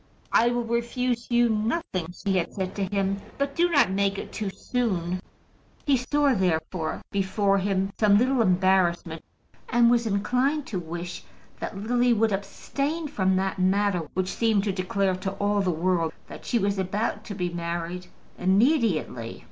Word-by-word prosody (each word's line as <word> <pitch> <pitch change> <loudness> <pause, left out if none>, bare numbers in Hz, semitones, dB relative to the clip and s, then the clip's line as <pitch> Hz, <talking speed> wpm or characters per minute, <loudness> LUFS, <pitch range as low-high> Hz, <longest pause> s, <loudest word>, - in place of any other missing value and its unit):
"I 235 - +5
will 240 0 0
refuse 235 +1 -1
you 240 0 +4
nothing," 215 - -1
she 190 +1 -1
had 170 - -4
said 190 -1 -3
to 200 - -1
him; 195 +1 -1 0.2
"but 280 0 -1
do 345 +1 +3
not 285 - +4
make 200 0 +1
it - - -6
too 210 -3 -3
soon." 185 -6 -2 0.7
He 280 - +4
saw, 280 +2 +2
therefore, 175 -4 -1
before 195 0 +1
him 195 0 0
some 205 -2 +5
little 255 +2 +3
embarrassment, 180 -4 +2 0.5
and 235 0 +5
was 235 -1 +2
inclined 250 +8 +1
to 190 - -3
wish 175 +1 -6 0.4
that 195 - -5
Lily 245 +4 +2
would 225 0 +2
abstain 285 +10 -3
from 190 -8 +1
that 190 +1 -1
manner 185 -3 +1
which 185 0 0
seemed 220 -4 +2
to 200 - 0
declare 190 0 0
to 190 +1 -3
all 205 +1 +1
the 190 - 0
world 170 -1 0
that - - -11
she 240 - +2
was 200 -2 0
about 200 +5 -1
to 205 - -6
be 180 -2 -2
married 170 +1 -4 0.3
immediately. 190 - +1
200 Hz, 165 wpm, -26 LUFS, 185-235 Hz, 0.7 s, I